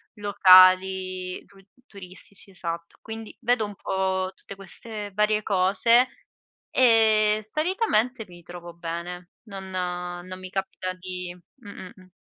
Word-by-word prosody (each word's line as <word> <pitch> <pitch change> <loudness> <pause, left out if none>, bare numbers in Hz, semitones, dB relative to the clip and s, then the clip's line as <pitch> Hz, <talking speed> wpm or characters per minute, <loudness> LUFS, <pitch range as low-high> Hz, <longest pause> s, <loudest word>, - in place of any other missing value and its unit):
locali 185 -2 +4
tu 200 - -22 0.3
turistici, 195 0 -12
esatto. 170 -1 -6
Quindi 220 0 -8
vedo 240 -2 +2
un 205 -1 -8
po' 190 0 -2
tutte 195 - -11
queste 205 +2 -8
varie 210 +1 +2
cose, 210 +6 +3 0.6
e 220 -3 +4
solitamente 260 - 0
mi 175 -1 -15
trovo 175 0 -10
bene. 170 +1 -6
Non 195 -3 -9
non 180 0 -4
mi 185 0 -9
capita 190 -1 -4
di 180 -1 -7 0.3
mh, 205 - -11
mh, 185 -2 -10
mh. 185 -1 -18
190 Hz, 125 wpm, -25 LUFS, 185-215 Hz, 0.6 s, locali